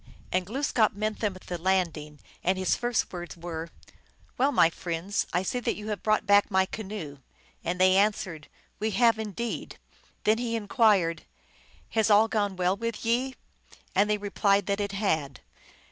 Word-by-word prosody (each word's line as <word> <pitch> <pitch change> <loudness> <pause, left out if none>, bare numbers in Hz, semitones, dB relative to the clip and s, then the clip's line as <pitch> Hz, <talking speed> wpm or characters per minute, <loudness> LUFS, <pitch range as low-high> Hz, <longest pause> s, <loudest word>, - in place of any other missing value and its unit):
And 180 0 0
Glooskap 235 -3 +1
met 215 +1 -2
them 205 -4 -1
at 185 - -13
the 175 -1 -5
landing, 165 -5 0 0.2
and 185 +2 +2
his 185 -1 +1
first 240 -4 -1
words 175 -1 -7
were, 165 -1 -6 0.3
" - - -34
Well, 275 +3 +4
my 170 -10 +5
friends, 175 +4 -2
I 180 - +1
see 250 +6 -1
that 245 - -1
you 210 +1 -7
have 210 - -3
brought 215 0 +1
back 205 0 +5
my 190 -2 +3
canoe." 190 -9 -7 0.4
And 180 +1 -2
they 185 0 +5
answered, 190 -6 0 0.2
" - - -38
We 220 - 0
have, 230 -2 +4
indeed." 220 +2 -4 0.5
Then 215 +2 +3
he 235 -1 -2
inquired, 205 - +2 0.3
" - - -29
Has 220 -1 +1
all 210 +1 +6
gone 205 -3 -1
well 180 +1 +1
with 230 +2 -4
ye? 255 +3 +1 0.3
" - - -25
And 200 +2 +3
they 210 - +2
replied 200 -1 +1
that 200 +1 -1
it 200 0 -3
had. 160 - -1
200 Hz, 185 wpm, -27 LUFS, 180-220 Hz, 0.5 s, all